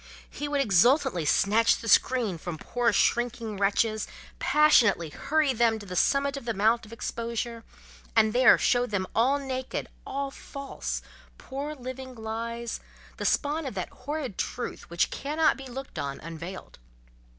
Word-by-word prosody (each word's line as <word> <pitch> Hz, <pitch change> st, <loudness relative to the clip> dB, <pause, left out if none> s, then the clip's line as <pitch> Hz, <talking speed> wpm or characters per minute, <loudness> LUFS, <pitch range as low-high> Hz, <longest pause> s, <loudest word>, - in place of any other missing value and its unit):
he 290 Hz, -, -5 dB
would 290 Hz, -1 st, +1 dB
exultantly 240 Hz, -, +3 dB
snatch 215 Hz, +8 st, +4 dB
the 230 Hz, -, -8 dB
screen 225 Hz, -7 st, +3 dB
from 175 Hz, -1 st, -5 dB
poor 240 Hz, +7 st, 0 dB
shrinking 235 Hz, 0 st, +1 dB
wretches, 215 Hz, +2 st, +1 dB, 0.3 s
passionately 265 Hz, -, +4 dB
hurry 295 Hz, -, +1 dB
them 230 Hz, -1 st, +3 dB
to 210 Hz, -, -10 dB
the 180 Hz, -2 st, -6 dB
summit 280 Hz, +8 st, +2 dB
of 275 Hz, -, -7 dB
the 230 Hz, -2 st, -2 dB
mount 220 Hz, +3 st, +2 dB
of -, -, -15 dB
exposure, 230 Hz, 0 st, -4 dB, 0.5 s
and 220 Hz, -1 st, +4 dB
there 255 Hz, +1 st, +7 dB
show 245 Hz, 0 st, +2 dB
them 200 Hz, -4 st, -1 dB
all 255 Hz, +6 st, +3 dB
naked, 260 Hz, -2 st, -4 dB, 0.2 s
all 275 Hz, 0 st, -3 dB
false—poor 275 Hz, +1 st, -7 dB
living 260 Hz, 0 st, -7 dB
lies—the 230 Hz, +1 st, -6 dB
spawn 300 Hz, +3 st, +1 dB
of 250 Hz, -, -6 dB
that 185 Hz, -2 st, -3 dB
horrid 275 Hz, -4 st, -5 dB
Truth 245 Hz, -, -4 dB
which 170 Hz, 0 st, +1 dB
cannot 305 Hz, +3 st, +1 dB
be 270 Hz, 0 st, -9 dB
looked 265 Hz, +2 st, -7 dB
on 140 Hz, -1 st, -4 dB
unveiled. 165 Hz, +3 st, -8 dB
235 Hz, 145 wpm, -27 LUFS, 215-270 Hz, 0.5 s, there